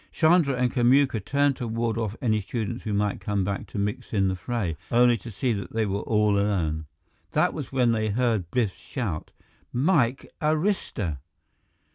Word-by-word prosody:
Chandra 160 Hz, -4 st, +4 dB
and 125 Hz, -1 st, 0 dB
Kamuka 130 Hz, 0 st, +4 dB
turned 140 Hz, +3 st, +2 dB
to 120 Hz, -, -4 dB
ward 115 Hz, 0 st, -1 dB
off 110 Hz, -2 st, -2 dB
any 110 Hz, -3 st, +2 dB
students 115 Hz, +4 st, -4 dB
who 110 Hz, -, -2 dB
might 105 Hz, 0 st, 0 dB
come 100 Hz, -2 st, 0 dB
back 100 Hz, +1 st, -3 dB
to -, -, -8 dB
mix 100 Hz, +3 st, -3 dB
in 95 Hz, -2 st, +3 dB
the 95 Hz, -, -1 dB
fray, 95 Hz, -4 st, -2 dB
only 120 Hz, 0 st, +5 dB
to 115 Hz, -, -9 dB
see 120 Hz, +3 st, -1 dB
that 100 Hz, -2 st, -5 dB
they 110 Hz, -1 st, +1 dB
were 100 Hz, 0 st, -1 dB
all 105 Hz, -2 st, +2 dB
alone. 80 Hz, -7 st, 0 dB, 0.5 s
That -, -, +2 dB
was -, -, -6 dB
when 125 Hz, -3 st, +3 dB
they 110 Hz, -1 st, 0 dB
heard 110 Hz, -5 st, 0 dB
Biff 110 Hz, -3 st, 0 dB
shout: 100 Hz, -, -4 dB, 0.4 s
"Mike 135 Hz, -2 st, +1 dB
Arista!" 150 Hz, -, 0 dB
115 Hz, 175 wpm, -26 LUFS, 100-125 Hz, 0.5 s, only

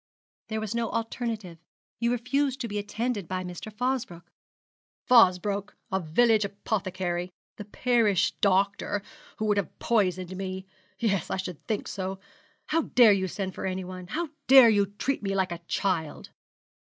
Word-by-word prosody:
'There 220 Hz, 0 st, -2 dB
was 220 Hz, 0 st, -3 dB
no 235 Hz, -1 st, -1 dB
alternative; 225 Hz, -6 st, -4 dB, 0.4 s
you 235 Hz, +1 st, +1 dB
refused 265 Hz, +3 st, 0 dB
to 240 Hz, -, -3 dB
be 205 Hz, -1 st, -3 dB
attended 205 Hz, -1 st, -3 dB
by 185 Hz, +1 st, -3 dB
Mr. 180 Hz, +4 st, -7 dB
Fosbroke.' 240 Hz, -7 st, -2 dB, 0.8 s
'Fosbroke 200 Hz, -3 st, +4 dB, 0.2 s
a 190 Hz, -, +1 dB
village 215 Hz, +6 st, +3 dB
apothecary, 185 Hz, -3 st, -2 dB, 0.3 s
the 210 Hz, -, -7 dB
parish 220 Hz, -3 st, +2 dB
doctor, 200 Hz, +1 st, +1 dB, 0.3 s
who 215 Hz, -, -2 dB
would 210 Hz, -1 st, +2 dB
have 200 Hz, -, -2 dB
poisoned 185 Hz, -5 st, 0 dB
me. 190 Hz, 0 st, -5 dB, 0.3 s
Yes, 200 Hz, -7 st, 0 dB
I -, -, -1 dB
should 180 Hz, -4 st, -6 dB
think 215 Hz, -3 st, -2 dB
so. 190 Hz, -1 st, -4 dB, 0.5 s
How 330 Hz, +2 st, +1 dB
dare 240 Hz, -8 st, +6 dB
you 190 Hz, -1 st, 0 dB
send 190 Hz, +1 st, -4 dB
for -, -, -4 dB
anyone? 185 Hz, -1 st, -5 dB
How 325 Hz, -, -3 dB, 0.2 s
dare 265 Hz, -3 st, +9 dB
you 200 Hz, -2 st, +3 dB
treat 205 Hz, +8 st, -2 dB
me 195 Hz, -1 st, -2 dB
like 190 Hz, -2 st, +1 dB
a 170 Hz, -, -4 dB
child?' 170 Hz, -6 st, -2 dB
200 Hz, 150 wpm, -27 LUFS, 185-230 Hz, 0.8 s, dare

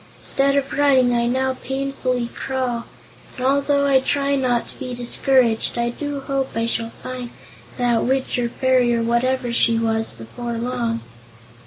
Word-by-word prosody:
Instead 275 Hz, 0 st, +1 dB
of 280 Hz, -1 st, 0 dB
running, 265 Hz, -4 st, +4 dB
I 235 Hz, 0 st, +1 dB
now 260 Hz, +2 st, +1 dB
painfully 265 Hz, -2 st, -2 dB
crawl, 255 Hz, -3 st, -2 dB, 0.5 s
and 255 Hz, -, -3 dB
although 280 Hz, +1 st, +2 dB
I 275 Hz, -1 st, +5 dB
try 280 Hz, +1 st, 0 dB
not 250 Hz, -3 st, 0 dB
to -, -, -13 dB
be 255 Hz, -2 st, -5 dB
discouraged 245 Hz, -1 st, +2 dB
I 235 Hz, 0 st, 0 dB
do 290 Hz, +2 st, -4 dB
hope 270 Hz, -1 st, -1 dB
I 230 Hz, 0 st, 0 dB
shall 230 Hz, 0 st, -1 dB
find 255 Hz, -1 st, -5 dB, 0.5 s
that 240 Hz, -2 st, +2 dB
witch 260 Hz, 0 st, 0 dB
or 240 Hz, -1 st, 0 dB
fairy, 250 Hz, -1 st, +2 dB
or 230 Hz, -, 0 dB
whatever 245 Hz, +1 st, 0 dB
she 230 Hz, -1 st, +4 dB
was, 225 Hz, -1 st, 0 dB
before 120 Hz, -, -7 dB
long." 235 Hz, -1 st, -2 dB
250 Hz, 160 wpm, -21 LUFS, 235-270 Hz, 0.5 s, I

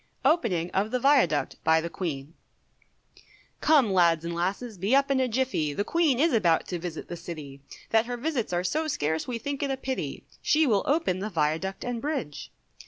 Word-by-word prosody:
OPENING 185 Hz, -, +2 dB
OF 200 Hz, +3 st, 0 dB
THE 250 Hz, -, 0 dB
VIADUCT 250 Hz, -, +3 dB
BY 160 Hz, 0 st, +4 dB
THE 170 Hz, -, -4 dB
QUEEN. 150 Hz, -4 st, -4 dB, 1.3 s
Come 280 Hz, -10 st, +4 dB
lads 170 Hz, -3 st, +3 dB
and 170 Hz, -, -3 dB
lasses, 195 Hz, +5 st, -3 dB
be 205 Hz, +8 st, +2 dB
up 275 Hz, 0 st, +3 dB
in 270 Hz, -, +2 dB
a 260 Hz, -, +2 dB
jiffy, 235 Hz, -, 0 dB
The 205 Hz, -, -1 dB
Queen 310 Hz, -2 st, +2 dB
is 320 Hz, +1 st, +3 dB
about 175 Hz, -8 st, +3 dB
to 175 Hz, -, -3 dB
visit 165 Hz, -2 st, -6 dB
the 175 Hz, -, -5 dB
City, 150 Hz, -5 st, -8 dB, 0.3 s
That 225 Hz, +1 st, +3 dB
her 245 Hz, 0 st, -3 dB
visits 260 Hz, -, -2 dB
are 175 Hz, 0 st, 0 dB
so 310 Hz, -, -1 dB
scarce, 160 Hz, -, -1 dB
we 245 Hz, -2 st, -2 dB
think 280 Hz, +4 st, -4 dB
it 285 Hz, -, -1 dB
a 270 Hz, -, -1 dB
pity, 265 Hz, 0 st, -4 dB, 0.2 s
She 310 Hz, +1 st, +3 dB
will 210 Hz, -7 st, +3 dB
open 285 Hz, -, +1 dB
the 205 Hz, +3 st, -3 dB
Viaduct 165 Hz, +3 st, -1 dB
and 245 Hz, -2 st, -3 dB
Bridge. 275 Hz, -, -4 dB
210 Hz, 195 wpm, -27 LUFS, 170-265 Hz, 1.3 s, BY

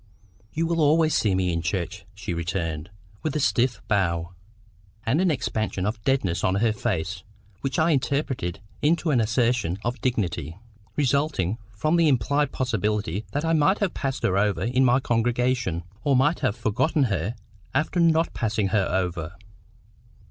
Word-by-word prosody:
"You 165 Hz, +2 st, -1 dB
will 165 Hz, 0 st, 0 dB
always 155 Hz, +1 st, +4 dB
see 105 Hz, -8 st, +2 dB
me 90 Hz, -2 st, +1 dB
in 85 Hz, -, -1 dB
church," 85 Hz, +2 st, -3 dB
she 100 Hz, -2 st, -4 dB
returned, 85 Hz, -1 st, -3 dB, 0.3 s
with 155 Hz, -2 st, -2 dB
a -, -, +1 dB
stiff 120 Hz, -1 st, +1 dB
bow, 85 Hz, -5 st, 0 dB, 0.7 s
and 135 Hz, +9 st, +2 dB
an 185 Hz, -, +3 dB
expansion 110 Hz, -, -1 dB
of 110 Hz, +2 st, -2 dB
deadness 115 Hz, -11 st, +1 dB
on 95 Hz, -, +2 dB
her 110 Hz, +2 st, +2 dB
face, 95 Hz, -5 st, -2 dB, 0.4 s
which 135 Hz, -2 st, -2 dB
I 165 Hz, +1 st, +3 dB
interpreted 130 Hz, -, -1 dB, 0.2 s
into 160 Hz, +2 st, +2 dB
an 125 Hz, -5 st, +3 dB
assertion 115 Hz, -5 st, +1 dB
of 120 Hz, +2 st, -2 dB
dignity, 85 Hz, -, -1 dB, 0.4 s
resulting 140 Hz, -, +1 dB, 0.2 s
from 155 Hz, +10 st, +1 dB
the 165 Hz, -1 st, +4 dB
implied 145 Hz, +3 st, +2 dB
possibility 105 Hz, -5 st, -1 dB
that 145 Hz, +3 st, -1 dB
I 165 Hz, -, +2 dB
might 160 Hz, +6 st, +4 dB
have 200 Hz, -4 st, -1 dB
passed 135 Hz, -2 st, -3 dB
her 95 Hz, +1 st, +2 dB
over 105 Hz, -1 st, +1 dB
in 125 Hz, +3 st, +2 dB
my 125 Hz, 0 st, +4 dB
congregation, 120 Hz, -6 st, 0 dB, 0.2 s
or 140 Hz, -2 st, +3 dB
might 150 Hz, +6 st, +3 dB
have 125 Hz, -7 st, 0 dB
forgotten 120 Hz, +7 st, +1 dB
her 100 Hz, -2 st, -1 dB, 0.4 s
after 160 Hz, +4 st, +1 dB
not 165 Hz, -1 st, +3 dB
passing 110 Hz, -3 st, 0 dB
her 95 Hz, -2 st, +2 dB
over. 90 Hz, -2 st, -2 dB
115 Hz, 160 wpm, -25 LUFS, 95-140 Hz, 0.7 s, always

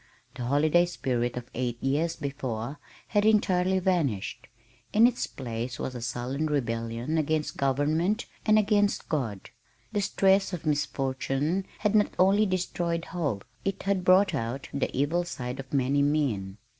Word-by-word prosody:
The 125 Hz, -, -5 dB
holiday 155 Hz, +6 st, +3 dB
spirit 125 Hz, -7 st, -2 dB
of 125 Hz, 0 st, -7 dB
eight 120 Hz, -1 st, -2 dB
years 155 Hz, +5 st, +1 dB
before 135 Hz, -2 st, -4 dB, 0.3 s
had 205 Hz, -2 st, +2 dB
entirely 190 Hz, -4 st, +3 dB
vanished. 170 Hz, -, -1 dB, 0.5 s
In 220 Hz, +2 st, +7 dB
its 245 Hz, 0 st, +1 dB
place 120 Hz, -1 st, -5 dB
was 130 Hz, -, -4 dB
a 125 Hz, -, -6 dB
sullen 125 Hz, +6 st, -2 dB
rebellion 120 Hz, +1 st, -1 dB
against 155 Hz, 0 st, -1 dB
government 155 Hz, -, +1 dB, 0.2 s
and 215 Hz, -1 st, +4 dB
against 205 Hz, -1 st, +2 dB
God. 115 Hz, -, -3 dB, 0.4 s
The 205 Hz, -2 st, 0 dB
stress 195 Hz, 0 st, +3 dB
of 170 Hz, -, -5 dB
misfortune 145 Hz, +3 st, -1 dB
had 210 Hz, -1 st, 0 dB
not 210 Hz, -1 st, +3 dB
only 200 Hz, +3 st, +4 dB
destroyed 175 Hz, -2 st, -1 dB
hope, 145 Hz, -, -2 dB, 0.2 s
it 195 Hz, -1 st, -2 dB
had 195 Hz, -2 st, 0 dB
brought 185 Hz, +1 st, +5 dB
out 130 Hz, 0 st, -3 dB
the 140 Hz, -, 0 dB
evil 150 Hz, +6 st, +1 dB
side 125 Hz, -6 st, -5 dB
of 135 Hz, -1 st, -8 dB
many 140 Hz, +1 st, +2 dB
men. 130 Hz, -10 st, 0 dB
150 Hz, 145 wpm, -28 LUFS, 125-185 Hz, 0.5 s, In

